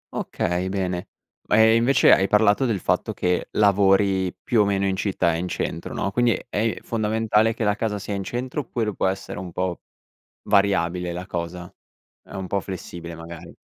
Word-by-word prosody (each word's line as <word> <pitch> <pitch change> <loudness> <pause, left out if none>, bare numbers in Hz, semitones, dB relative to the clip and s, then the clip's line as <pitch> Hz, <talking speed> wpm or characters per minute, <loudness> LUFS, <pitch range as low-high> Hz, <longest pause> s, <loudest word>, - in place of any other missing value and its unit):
Okay 90 +2 -2
bene. 90 -2 -2 0.4
E 110 +1 +5
invece, 120 +4 +5
hai 95 - +3
parlato 105 +4 +3
del 105 -5 0
fatto - - 0
che, 90 0 -1
lavori 95 -2 +3
più 115 -3 +3
o - - +3
meno 100 -1 0
in 95 -1 0
città 95 -3 0
e 80 - -2
in 90 - -3
centro, 85 -1 -4
no, 95 - -1
quindi 120 +1 +2
è 110 +2 -1
fondamentale 110 0 +1
che 115 - -3
la 105 -1 +3
casa 110 -1 -2
sia 100 +1 -5
in 100 -1 -3
centro, 125 +7 -4
oppure 115 -4 -3
può - - 0
essere 95 -1 -4
un 90 -1 -7
po' 90 0 -3 0.6
variabile 90 -3 +1
la 90 +1 -6
cosa, 90 0 -5 0.5
è - - -16
un 95 -1 -4
po' 100 - 0
flessibile, 85 -3 -7
magari? 80 0 -10
100 Hz, 180 wpm, -23 LUFS, 90-110 Hz, 0.6 s, E